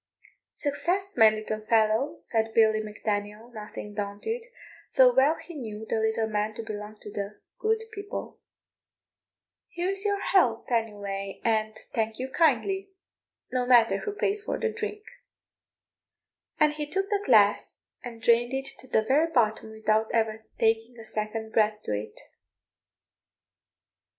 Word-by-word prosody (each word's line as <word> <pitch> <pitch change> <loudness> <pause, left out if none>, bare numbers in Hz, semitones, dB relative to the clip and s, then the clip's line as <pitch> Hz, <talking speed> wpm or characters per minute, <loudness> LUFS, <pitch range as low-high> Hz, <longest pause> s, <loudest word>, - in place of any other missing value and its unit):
"Success, 360 +7 0
my 220 -1 +8
little 215 0 -3
fellow," 220 +4 +2
said 225 -1 -1
Billy 220 -1 +5
Mac 215 -1 -10
Daniel, 210 +2 -2
nothing 210 -1 -8
daunted, 205 - -3 0.5
though 255 -1 +7
well 270 +5 +4
he 345 - -11
knew 220 -7 -6
the 225 - 0
little 220 0 +1
man 215 0 -1
to 230 - -5
belong 210 -1 -7
to 210 - -9
the 200 +1 -5 0.2
good 445 +1 +1
people; 405 -1 -6 1.3
"here's 380 +3 -2
your 405 -1 +1
health, 255 - +2
anyway, 200 -4 -2
and 220 -1 +1 0.2
thank 220 -1 -1
you 255 - -3
kindly; 385 +6 +2 0.6
no 250 -1 0
matter 240 -2 +6
who 420 - -3
pays 410 0 -1
for - - -2
the 455 - +1
drink;" 430 -1 -5 1.6
and 300 -1 +4
he 300 -1 -4
took 390 +5 -1
the 405 -1 +1
glass 210 - +3 0.2
and 230 -2 -9
drained 240 +2 +4
it 270 0 -2
to 260 - -11
the 220 -3 +2
very 300 +8 +2
bottom 220 -5 +1
without 220 0 +1
ever 220 -1 0
taking 225 +2 +1
a 225 - -10
second 220 +1 -4
breath 215 -1 +3
to - - -2
it. 105 +1 -6
225 Hz, 145 wpm, -27 LUFS, 215-300 Hz, 1.6 s, my